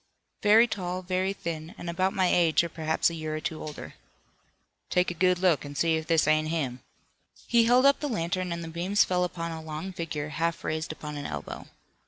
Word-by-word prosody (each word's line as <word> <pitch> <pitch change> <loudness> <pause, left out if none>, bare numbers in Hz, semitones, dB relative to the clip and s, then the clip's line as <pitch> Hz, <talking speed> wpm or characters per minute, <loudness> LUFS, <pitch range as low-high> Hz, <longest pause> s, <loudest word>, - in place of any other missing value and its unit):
"Very 215 +3 +7
tall, 185 -5 -4
very 185 +1 0
thin, 165 -3 -6
and 175 - -8
about 185 +3 +1
my 190 -1 +1
age 170 -2 +4
or 170 - -3
perhaps 160 +1 0
a - - -6
year 155 -1 -4
or - - -2
two 155 0 -4
older." 150 -1 -7 1.0
"Take 180 0 +2
a - - -4
good 180 +1 +2
look, 180 -4 +2
an' 145 0 -8
see 165 +2 +2
if 160 0 -3
this 165 -3 +3
ain't 155 0 +3
him." 140 -6 -2 0.7
He 235 -1 +4
held 250 +3 +5
up 280 0 +5
the 295 - -2
lantern 180 -3 -2
and 170 0 -3
the - - -6
beams 175 +5 +2
fell 180 -1 0
upon 170 -2 -3
a 160 -1 -6
long 160 +4 -6
figure 155 -4 -4
half 165 +2 -2
raised 160 0 -2
upon 150 -1 -7
an 145 - -4
elbow. - - -6
170 Hz, 215 wpm, -28 LUFS, 155-185 Hz, 1.0 s, Very